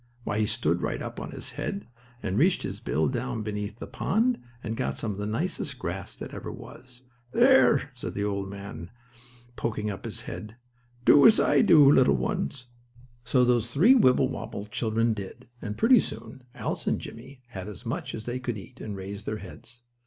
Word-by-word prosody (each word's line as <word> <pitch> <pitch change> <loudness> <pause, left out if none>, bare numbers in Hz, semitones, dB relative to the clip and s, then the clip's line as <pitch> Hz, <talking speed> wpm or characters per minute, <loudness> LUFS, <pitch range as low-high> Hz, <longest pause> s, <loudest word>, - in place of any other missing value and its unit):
Why, 105 -2 -1
he 105 - +2
stood 85 -6 0
right - - -2
up - - -6
on - - -6
his - - -7
head, 100 +1 -4 0.4
and 95 -1 -1
reached 180 +4 +3
his - - -4
bill 75 +6 0
down 65 - -2
beneath 105 0 -4
the - - -6
pond, 235 +4 +1 0.2
and 110 - -3
got - - -2
some 110 - -2
of 100 - -6
the 105 - -2
nicest 140 +3 -2
grass 95 -5 -5
that - - -8
ever - - -6
was. 125 0 -10 0.3
"There," 240 - +5
said 125 - -6
the 100 - -1
old 100 -1 -2
gentleman 100 -3 -7
duck, 120 +1 -26
poking 105 -2 -2
up 95 - -8
his - - -5
head, 110 +1 -7 0.5
"do 145 - +8
as 225 - +6
I - - +4
did, 210 -8 +6
little 140 -3 +6
ones." 145 - -2 0.5
So 125 +1 +3
those 120 -2 +2
three 180 - +6
Wibblewobble 125 - +2
children 115 0 +1
did, 110 +5 -8
and 105 -1 -5
pretty 245 +1 +6
soon, 130 -9 -6
Alice - - -3
and - - +1
Jimmie 130 +2 -10
had 95 -4 -7
as 105 -3 -9
much - - -3
as 110 - -7
they 125 +1 -3
could 120 -3 -3
eat, 95 - -12
and 105 -2 -5
raised 100 +2 -7
their 110 - -1
heads. 115 +4 -11
115 Hz, 195 wpm, -27 LUFS, 105-130 Hz, 0.5 s, do